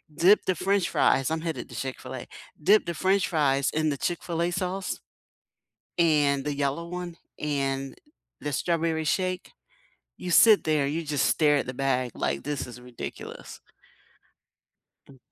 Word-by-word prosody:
dip 185 +7 +5
the 185 - +2
french 195 +1 +1
fries 135 -1 +3
I'm 160 0 -1
headed 160 -7 -4
to - - -10
Chick-fil-A. 130 -1 -6 0.3
Dip 205 +7 +5
the 170 - -2
french 190 +4 +2
fries 140 -4 +2
in 155 0 +1
the 140 - -2
Chick-fil-A 170 +1 -1
sauce, 185 +1 -3 1.0
and 145 -5 +3
the 145 -1 -2
yellow 140 +4 -2
one, 180 -1 -6 0.2
and 135 -2 -2 0.5
the 145 - -3
strawberry 165 +1 0
shake 185 +3 -1 0.7
you 180 - -3
sit 215 +3 +7
there, 155 -2 +2
you 160 +3 -2
just 145 -3 +1
stare 150 -2 +3
at 140 - -1
the 130 - -5
bag 130 -2 0
like, 70 - -1
"This 145 -2 -3
is 125 0 -10
ridiculous." 125 -1 -8 1.5
Mm. 135 - -15
155 Hz, 150 wpm, -27 LUFS, 135-175 Hz, 1.5 s, sit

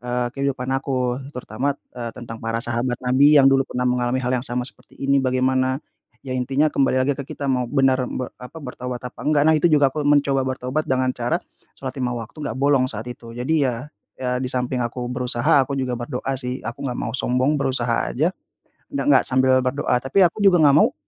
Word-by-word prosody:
eee, 125 0 -1
kehidupan 135 -2 -2
aku 130 -1 -1 0.2
terutama, 130 +4 -2 0.2
eee, 120 -2 -5
tentang 115 -2 -8
para 115 +1 -2
sahabat 120 +1 -1
nabi 140 +4 +5
yang 140 - +7
dulu 135 0 +4
pernah 125 0 -2
mengalami 125 0 +1
hal 125 - 0
yang 130 - -5
sama 125 +1 -2
seperti 135 - -13
ini 140 0 +2
bagaimana, 130 0 +1 0.5
ya 130 - -4
intinya 135 +4 +1
kembali 135 -1 +2
lagi 145 - +2
ke 140 -1 -7
kita 145 - -5
mau 125 -3 0
benaran 130 -2 +2
be 125 - -4
apa, 125 +6 -10
bertaubat 125 -4 -6
apa 125 - -8
enggak. 150 -1 +2
Nah 160 - +5
itu 155 +3 +3
juga 145 -4 +4
mencoba 145 -2 +2
bertaubat 130 +3 -2
dengan 130 -1 +1
cara 120 0 -1 0.4
shalat 130 -1 -5
5 125 -1 -1
waktu 115 +6 -8
nggak 140 -6 -4
bolong 135 -1 +3
saat 110 -2 -5
itu. 115 -1 -12
Jadi 140 +3 +1
ya, 120 +2 -4 0.3
ya 125 -1 -2
di 130 - -2
samping 125 0 -1
aku 120 +1 -3
berusaha 125 +2 +2
aku 135 +1 -2
juga 130 -2 -1
berdoa 125 +2 -3
sih, 125 0 -5
aku 115 - -6
nggak 125 - -3
mau 115 - -3
sombong 130 +3 +1
berusaha 120 -3 0
aja, 160 +8 0 0.5
d - - -17
nggak 290 - +4
sambil 130 0 +4
berdoa. 130 -1 0
Tapi 135 +10 +2
aku 175 +3 +3
juga 190 -5 +5
nggak 145 -1 +6
mau, - - +3
130 Hz, 205 wpm, -22 LUFS, 125-140 Hz, 0.5 s, yang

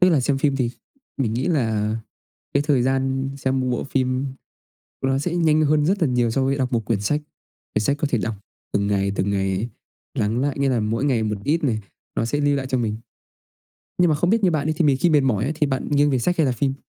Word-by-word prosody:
Tức 180 - +6
là 155 -5 +3
xem 135 +2 +1
phim 140 -1 +1
thì 125 -3 0 0.5
mình 125 -6 0
nghĩ 125 - -1
là 110 -8 +1 0.6
cái 140 - +3
thời 140 -5 +3
gian 135 +1 0
xem 130 -1 0
bộ 125 - -1
phim, 130 -1 0 0.8
ôi, 135 - 0
nó 135 - +2
sẽ 170 +4 -2
nhanh 155 -3 +3
hơn 150 0 +3
rất 195 +4 +1
là - - +3
nhiều 120 -2 +1
so 135 +4 +1
với 135 +1 +1
đọc 130 -2 -1
một 115 -2 0
quyển 110 -2 0
sách. 145 +9 0 0.5
Quyển 105 - +1
sách 140 +6 +1
có 150 - +1
thể 120 - +3
đọc 110 +1 -2 0.4
từng 100 0 +1
ngày, 100 -1 +1
từng 100 - 0
ngày 95 +3 -1 0.4
lắng 110 +4 0
lại, 140 0 -1
nghĩa 140 -1 +2
là 125 -3 +1
mỗi 115 +5 -1
ngày 125 -6 +2
một 105 -1 -1
ít 155 +4 +1
này 115 -6 +1 0.4
nó - - 0
sẽ 145 +5 -1
lưu 145 0 +2
lại 135 -1 -2
cho 130 -1 0
mình. 110 -3 -1 1.0
Nhưng 175 -1 +5
mà - - +3
không 175 +4 +1
biết 225 -1 +2
như 185 - +4
bạn 155 -3 0
đi 155 - +1
thì 165 - +2
mình 140 -3 +4
khi 175 - +4
mệt 150 -2 +5
mỏi 120 -6 +1
ấy 140 - 0
thì 150 - +2
bạn 130 -2 -2
nghiêng 145 0 +3
về 130 - +2
sách 175 +9 0
hay 160 - +4
là 130 - +2
phim? 135 +2 0
135 Hz, 260 wpm, -22 LUFS, 115-145 Hz, 1.0 s, Tức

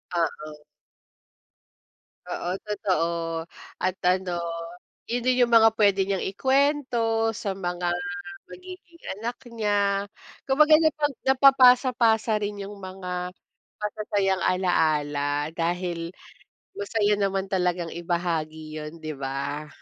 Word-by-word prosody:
Oo. 155 -2 -3 1.7
Oo, 175 - -3 0.2
totoo. 190 -5 0 0.7
At 185 0 0
ano, 180 -1 +1 0.7
'yon 240 +1 -2
din 255 0 +3
'yong 240 - +4
mga 225 0 +6
puwede 200 -3 +3
niyang 195 -1 -1
ikuwento 240 -1 +1
sa 200 -2 -4
mga 175 -1 -2 0.6
magiging 365 -2 -12 0.2
anak 235 +3 -4
niya. 205 -3 0 0.4
Kumbaga 300 +3 +6
napag 305 -2 +1
napapasa-pasa 250 -4 +5
rin 205 -1 -4
'yong 200 +1 -8
mga 180 -2 -5 0.5
masasayang 205 -2 -1
alaala 150 -5 +1
dahil 170 0 -2 0.6
masaya 225 - +1
naman 195 -1 -1
talagang 180 -3 -1
ibahagi 165 -3 -3
'yon, 150 0 -6
'di 155 -1 -5
ba? 140 +2 -4
195 Hz, 100 wpm, -25 LUFS, 175-230 Hz, 1.7 s, mga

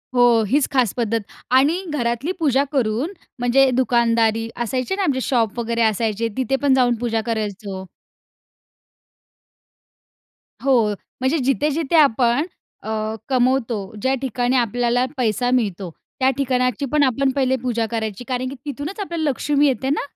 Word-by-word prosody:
हो, 240 -2 +5
हीच 285 +4 +2
खास 250 -6 +2
पद्धत. 230 -1 0 0.3
आणि 285 +8 +4
घरातली 240 +4 -1
पूजा 280 -4 +2
करून 260 - 0 0.3
म्हणजे 255 +2 +4
दुकानदारी 230 -3 +2
असायचे 255 - -2
ना 395 - -1
आमचे 265 -6 0
शॉप 235 -3 0
वगैरे 235 0 -1
असायचे 220 0 0
तिथे 260 +1 0
पण 280 -2 +3
जाऊन 245 -2 +3
पूजा 225 -2 -1
करायचो. 205 -4 -4 2.8
हो, 270 -1 +4 0.4
म्हणजे 260 +5 +1
जिथे-जिथे 300 +3 0
आपण 260 -2 +4 0.4
अ, - - -6 0.4
कमवतो, 255 -2 +1 0.2
ज्या 260 +4 +1
ठिकाणी 250 -1 0
आपल्याला 245 +1 +1
पैसा 245 +1 0
मिळतो, 200 -7 0 0.3
त्या 265 0 +4
ठिकाणाची 255 -1 0
पण 300 -1 +3
आपण 265 +1 +2
पहिले 260 -1 +2
पूजा 235 -3 -1
करायची. 220 0 -3
कारण 255 0 -2
की 275 - -7
तिथूनच 295 +8 -5
आपल्याला 335 -6 -2
लक्ष्मी 290 +2 +1
येते 265 0 -1
ना? 290 - +1
250 Hz, 135 wpm, -21 LUFS, 230-275 Hz, 2.8 s, हो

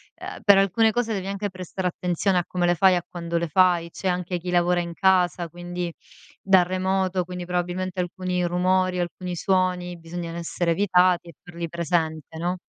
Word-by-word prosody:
ehm, - - -8
per 200 -1 +7
alcune 200 +3 +3
cose 230 0 -1
devi 195 -2 -3
anche 200 +1 -3
prestare 185 0 -4
attenzione 180 +2 0
a - - -1
come 180 -1 -1
le 175 0 +3
fai 185 0 +5
a 175 - -3
quando 170 -1 -3
le 170 - -1
fai, 175 0 +3
c'è 190 +2 -3
anche 180 0 -1
chi 180 +1 -6
lavora 175 0 +2
in 170 -1 -6
casa, 180 -1 +2
quindi 175 +1 -5 0.5
da 190 -2 +5
remoto, 185 0 0
quindi 180 0 -6
probabilmente 180 +1 -2
alcuni 180 0 -2
rumori, 180 +1 +1
alcuni 175 0 -4
suoni, 180 -2 0
bisogna 165 0 -6
r - - -7
essere 170 0 -1
evitati 180 -1 +3
e - - -12
farli 170 -1 -6
presente, 160 -2 -2
no? 175 +2 -1
180 Hz, 185 wpm, -24 LUFS, 175-185 Hz, 0.5 s, per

